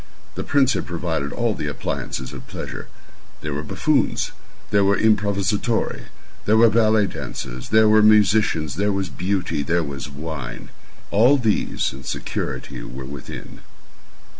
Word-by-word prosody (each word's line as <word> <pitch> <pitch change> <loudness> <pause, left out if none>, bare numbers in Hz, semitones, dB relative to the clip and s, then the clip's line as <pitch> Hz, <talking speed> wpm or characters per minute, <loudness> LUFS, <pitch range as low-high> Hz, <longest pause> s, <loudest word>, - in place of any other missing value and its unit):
The - - -4
prince 135 -2 +3
had - - -3
provided 80 -4 -2
all - - 0
the - - -4
appliances 65 -1 -4
of - - -9
pleasure. - - -6 0.5
There 75 -1 -3
were 70 - -2
buffoons, 75 - +1 0.4
there 100 -1 +4
were 100 +1 +3
improvisatori, 105 +1 +1 0.4
there 110 +1 +4
were 115 0 +6
ballet 110 -1 +4
dancers, 65 -9 -6
there 110 0 +5
were 110 0 +6
musicians, 105 -8 +4
there 105 +1 +2
was 95 -2 -1
Beauty, 90 +3 -1
there 85 +4 +1
was 70 -1 -5
wine. 70 -3 -6 0.4
All 120 +8 +5
these 110 - 0
and 65 0 -10
security - - -4
were 65 +2 -7
within. 70 0 -8
95 Hz, 140 wpm, -22 LUFS, 75-110 Hz, 0.5 s, were